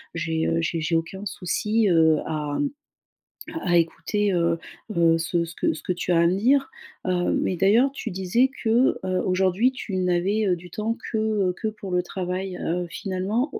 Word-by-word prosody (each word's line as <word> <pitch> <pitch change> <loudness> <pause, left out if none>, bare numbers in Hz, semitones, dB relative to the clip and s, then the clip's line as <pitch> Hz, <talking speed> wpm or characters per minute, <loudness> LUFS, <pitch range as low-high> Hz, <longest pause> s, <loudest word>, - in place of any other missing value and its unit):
j'ai, 165 -1 -1
heu, 165 - +1
j'ai 165 0 -1
j'ai 165 +1 0
aucun 190 +5 -3
souci, 210 +5 0
heu, 160 -2 +5
à 150 -2 -2 1.1
à 175 -1 +4
écouter, 170 +5 0
heu 170 -1 +2 0.4
heu, 165 -1 +4
ce 170 +1 0
ce 165 - -10
que - - +1
ce 155 - -9
que - - -1
tu 180 0 -2
as 165 - +4
à 170 - +4
me 185 +3 +1
dire. 270 +6 +3 0.4
Heu, 180 -1 +1
mais 180 - -1
d'ailleurs, 225 +9 +4
tu 275 - -5
disais 190 +8 +2
que, 235 +3 +3
heu, 185 -1 0
aujourd'hui 190 +7 +2
tu 205 -6 -5
n'avais, 185 +4 +1
heu, 180 - +3
du 175 +1 -12
temps 225 +4 -2
que, 220 - 0
heu, 210 -4 +1
que 220 - 0
pour 210 -3 -6
le 180 0 +2
travail, 185 +1 -4
heu, 175 +1 -1
finalement, 200 - -2
heu, - - -3
185 Hz, 195 wpm, -24 LUFS, 170-210 Hz, 1.1 s, heu